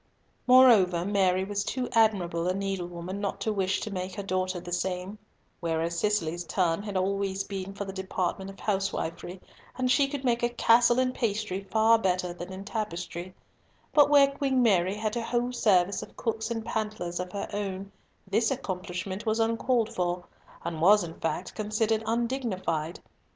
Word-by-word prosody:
Moreover, 220 -9 +6
Mary 190 -2 +2
was 200 +1 -2
too 255 +3 -2
admirable 185 -7 +2
a 185 - +1
needlewoman 185 -1 -4
not 200 - -2
to 220 - 0
wish 190 -1 0
to 215 - -4
make 185 0 -4
her 200 - -4
daughter 185 -1 -1
the 175 - -9
same; 180 +3 -3 0.4
whereas 165 0 -1
Cicely's 175 -4 0
turn 175 0 0
had 205 -2 -4
always 195 0 0
been 195 0 -6
for 200 - -4
the 195 - -6
department 190 0 -3
of 195 - -12
housewifery, 195 -3 -2 0.4
and 255 -1 +1
she 280 0 +4
could 275 -1 -5
make 240 -1 +2
a 240 - +2
castle 240 0 +4
in 255 0 +2
pastry 210 -5 -2
far 225 +1 +4
better 180 -3 0
than 175 +1 -8
in 190 +1 -7
tapestry; 180 -4 -5 0.6
but 290 -1 +6
where 280 -1 +6
Queen 270 -2 +1
Mary 190 -3 +3
had 215 +1 -2
a 235 - -1
whole 240 +1 -1
service 200 -5 +2
of - - -11
cooks 225 -1 -2
and 225 -1 -3
pantlers 210 -6 -3
of 180 0 -4
her 200 - -4
own, 195 -1 -4 0.4
this 220 +4 +2
accomplishment 185 -5 -4
was 220 +1 +1
uncalled 230 0 +1
for, 180 -2 -2 0.4
and 165 -2 -3
was 205 +3 +6
in 165 -1 -6
fact 165 - -3
considered 215 +1 0
undignified. 225 - -1
195 Hz, 170 wpm, -28 LUFS, 180-225 Hz, 0.6 s, Moreover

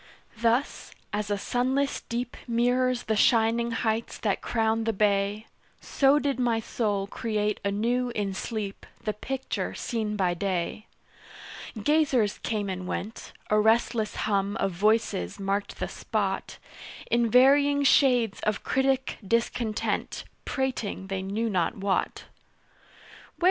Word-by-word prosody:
Thus, 235 +4 0 0.2
as 210 0 -2
a 205 - 0
sunless 260 +6 0
deep 240 +1 -3
Mirrors 245 +1 +1
the 220 - 0
shining 230 +1 +3
heights 225 0 -1
that 205 -3 -1
crown 225 -1 0
the 225 - +1
bay, 205 +1 +1 0.3
So 275 +1 +3
did 280 -3 0
my 235 -2 +2
soul 210 -3 -1
create 210 0 -2
anew 235 +5 0
in 200 -2 -1
sleep 205 0 -5 0.2
The 215 - -1
picture 265 +5 -4
seen 220 -3 -2
by 185 -3 +1
day. 185 +3 -2 0.9
Gazers 265 -5 +2
came 210 -3 -2
and 185 -1 -4
went 215 +5 -5 0.2
A 215 - +5
restless 220 0 +2
hum 200 0 0
of 195 - 0
voices 195 - +1
marked 200 +1 -2
the - - -1
spot - - -3 0.5
In 235 -1 +3
varying 280 +4 +5
shades 250 -6 +4
of 215 -1 -1
critic 265 0 0
discontent 230 +1 -1 0.2
Prating 240 -8 -2
they 195 -1 -2
knew 205 +4 -2
not 185 -4 0
what. 195 0 -1
220 Hz, 125 wpm, -27 LUFS, 200-245 Hz, 0.9 s, A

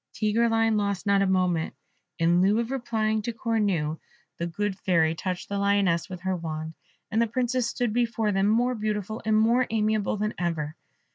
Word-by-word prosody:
Tigreline 225 0 +2
lost 200 -1 -1
not 200 -1 +3
a 195 - +2
moment: 180 -3 +1 0.4
in 170 +1 +3
lieu 200 +3 +3
of 235 +2 -1
replying 220 -4 0
to 235 - -3
Cornue, 205 -9 -1 0.4
the 170 - -1
good 195 +3 -2
Fairy 165 -4 +2
touched 180 +2 -4
the 200 0 -2
lioness 200 -3 +2
with 180 -2 -7
her 190 0 -1
wand, 160 -2 -5 0.4
and 220 +2 +2
the 230 - +2
Princess 250 +1 0
stood 240 -3 -1
before 230 -2 +1
them 195 0 +2
more 240 +4 +2
beautiful 215 -1 -3
and 215 -1 +3
more 235 +3 +3
amiable 215 -1 0
than 210 +1 -1
ever. 160 -4 -2
210 Hz, 180 wpm, -26 LUFS, 180-225 Hz, 0.4 s, not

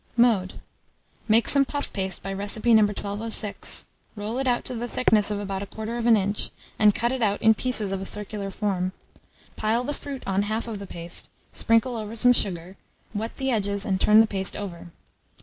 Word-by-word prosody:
Mode. 220 -6 +2 0.7
Make 225 +1 +4
some 280 -1 +5
puff 285 +1 -4
paste 190 -2 -3
by 195 +1 -4
recipe 205 +4 +1
No. 220 - +7
1206; 205 0 +1 0.3
roll 215 +4 -4
it 270 - -1
out 245 -1 +1
to 255 - -3
the 240 0 -4
thickness 220 -4 +2
of 205 -1 -2
about 195 -1 -4
1/4 225 +3 0
inch, 200 +1 -1 0.3
and 210 -2 +5
cut 235 +1 +1
it 260 -1 -3
out 205 -2 +1
in 220 - +7
pieces 220 -4 0
of 195 -1 -2
a - - -5
circular 210 -1 -3
form; 190 -2 -2 0.6
pile 225 +3 0
the 290 - -3
fruit 280 -2 -7
on 195 0 +1
half 215 +3 -2
of 220 -3 -5
the 200 - -8
paste, 170 0 -3 0.2
sprinkle 230 +2 +2
over 220 0 -5
some 245 +2 +5
sugar, 185 -4 -3 0.4
wet 220 +2 -4
the 265 0 -1
edges 200 -2 0
and 190 -2 -1
turn 215 +1 +7
the - - +4
paste 195 -3 -1
over. 180 -5 -7
210 Hz, 190 wpm, -25 LUFS, 200-230 Hz, 0.7 s, No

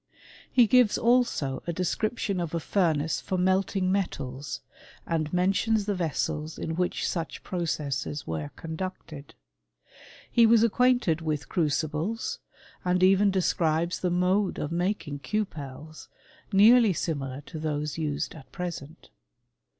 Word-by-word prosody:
He 245 -2 +6
gives 245 -1 +4
also 235 - +1
a 170 - -1
description 195 +3 -1
of 170 -1 -3
a - - 0
furnace 160 -4 0
for 185 - -2
melting 185 +1 +1
metals, 145 -8 -3 0.4
and 155 -2 -1
mentions 195 +4 +2
the 205 - 0
vessels 160 -2 -2
in 160 - -3
which 180 +1 -1
such 165 -2 -4
pro« 180 - -4
cesses 145 -3 -3
were 80 -2 -4
conducted. 160 -3 -7 1.0
He 235 -1 +6
was 230 0 +5
acquainted 245 -7 +3
with 150 -3 -2
era* 160 -4 +3
cibles; 165 - -2 0.4
and 180 0 +1
even 195 +2 +5
describes 170 -3 +1
the 180 - 0
mode 180 +3 +1
of 150 - -3
making 170 -4 -2
cupetei 155 -3 -5 0.4
nearly 220 +1 +6
similar 140 -5 -3
to 155 +2 -9
those 150 0 -2
used 150 -2 -2
at 155 -4 -13
present. 170 -3 -7
175 Hz, 130 wpm, -27 LUFS, 155-195 Hz, 1.0 s, He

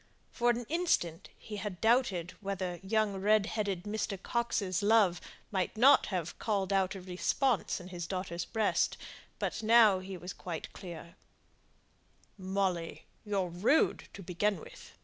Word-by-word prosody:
For 240 0 +1
an 240 0 0
instant 310 - 0
he 210 -2 -8
had 200 -3 -5
doubted 220 -7 +2
whether 190 -3 -3
young 205 0 0
red 210 +1 +3
headed 200 -5 -2
Mr. 205 -2 -3
Coxe's 205 -4 -1
love 205 -4 +4 0.3
might 190 +1 -1
not 265 +5 +6
have 175 -5 -3
called 200 -3 0
out 190 0 +1
a 190 - -7
response 190 +7 0
in 180 0 -10
his 175 -2 -5
daughter's 185 -2 -3
breast; 220 -2 +1 0.4
but - - -2
he 210 -4 +4
was 180 +1 -7
quite 170 -3 -6
clear 170 -2 -9 1.2
now. 185 - -10
"Molly, 185 -4 -1 0.2
you're 195 -4 -1
rude 200 - +2
to 195 - -9
begin 190 +2 0
with. - - -12
195 Hz, 145 wpm, -32 LUFS, 180-215 Hz, 1.2 s, not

